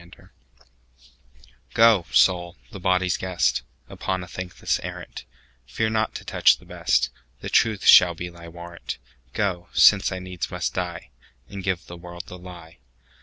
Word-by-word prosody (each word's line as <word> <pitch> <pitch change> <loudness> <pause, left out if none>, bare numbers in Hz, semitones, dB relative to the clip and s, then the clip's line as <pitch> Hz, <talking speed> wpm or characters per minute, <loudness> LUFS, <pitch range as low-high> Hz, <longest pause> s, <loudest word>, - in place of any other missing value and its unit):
The 85 - -17
Lie - - -20 1.5
GO, 115 -6 +5
Soul, 90 -1 +3
the 100 - -8
body's 90 -1 +1
guest, 90 -8 0 0.3
Upon 95 +8 -3
a - - -10
thankless 90 0 -3
arrant:Fear 65 - -6
not 110 0 -1
to - - -7
touch - - +4
the - - -19
best; 65 -1 0 0.3
The - - -5
truth 110 -4 +2
shall 90 -1 +8
be 90 +2 -5
thy 85 -1 -12
warrant:Go, 85 0 -6
since 100 0 +5
I 95 - -3
needs 90 -1 -5
must - - -3
die, 90 -2 -5 0.4
And 100 -1 -7
give 95 -2 -2
the 85 - -10
world 85 0 -9
the 90 - -10
lie. 85 -2 -12
90 Hz, 150 wpm, -24 LUFS, 85-95 Hz, 1.5 s, shall